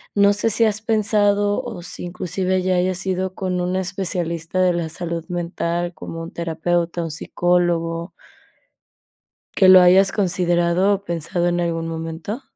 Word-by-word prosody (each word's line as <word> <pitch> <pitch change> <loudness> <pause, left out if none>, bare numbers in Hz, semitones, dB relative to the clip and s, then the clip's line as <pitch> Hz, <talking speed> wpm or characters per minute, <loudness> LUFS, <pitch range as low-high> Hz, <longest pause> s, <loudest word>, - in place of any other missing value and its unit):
¿no 200 0 +5
sé, 210 +2 +1
si 225 +2 +3
has 215 0 0
pensado, 205 -1 +2
o 235 -7 -7
si 180 - -5
inclusive 185 +1 -2
ya 185 0 +1
hayas 185 +1 0
ido, 190 0 -1
con 185 -1 -2
un 180 +1 -1
especialista 180 -2 -2
de 180 -1 +3
la 170 -2 -2
salud 165 0 -5
mental, 175 0 -2
como 165 - -7
un 165 - -8
terapeuta, 170 +1 -2
un 165 - -4
psicólogo 170 +1 0 1.5
que 190 - +5
lo 185 0 +9
hayas 185 +2 +6
considerado 180 -1 +1
o 200 0 -6
pensado 170 0 -2
en 175 0 +1
algún 165 -1 -2
momento? 165 +8 -5
180 Hz, 155 wpm, -21 LUFS, 170-190 Hz, 1.5 s, lo